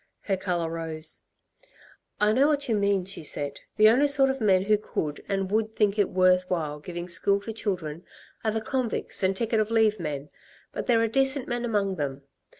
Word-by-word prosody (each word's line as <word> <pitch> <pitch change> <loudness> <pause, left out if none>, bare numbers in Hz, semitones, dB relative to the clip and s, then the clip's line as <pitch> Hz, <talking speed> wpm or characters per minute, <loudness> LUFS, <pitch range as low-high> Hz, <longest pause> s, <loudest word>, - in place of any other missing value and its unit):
Her 195 - -1
colour 175 -3 -2
rose. 160 -1 -5 1.0
"I 210 +1 +3
know 270 +5 +4
what 290 -2 0
you 230 - +1
mean," 200 -2 +1
she 190 - -4
said. 145 -2 -4 0.2
"The 215 0 +7
only 265 +6 +4
sort 275 -2 +6
of 265 -1 -6
men 190 -3 +3
who 210 +1 +2
could 150 -7 -4
and 195 -1 -1
would 220 +1 0
think 210 -1 +1
it 205 - +3
worth 185 0 +3
while 155 -4 -2
giving 175 +3 -6
school 200 +3 +1
to 225 +2 -6
children 180 -7 -4 0.4
are 220 - +1
the 220 +1 -1
convicts 250 0 -2
and 190 0 +2
ticket 225 +2 0
of 215 0 0
leave 220 -2 +2
men; 150 -3 -5 0.4
but - - -5
there 230 -2 +4
are - - +2
decent 270 +3 +1
men 240 0 -2
among 200 -4 0
them. 140 -2 -4
200 Hz, 200 wpm, -26 LUFS, 175-225 Hz, 1.0 s, The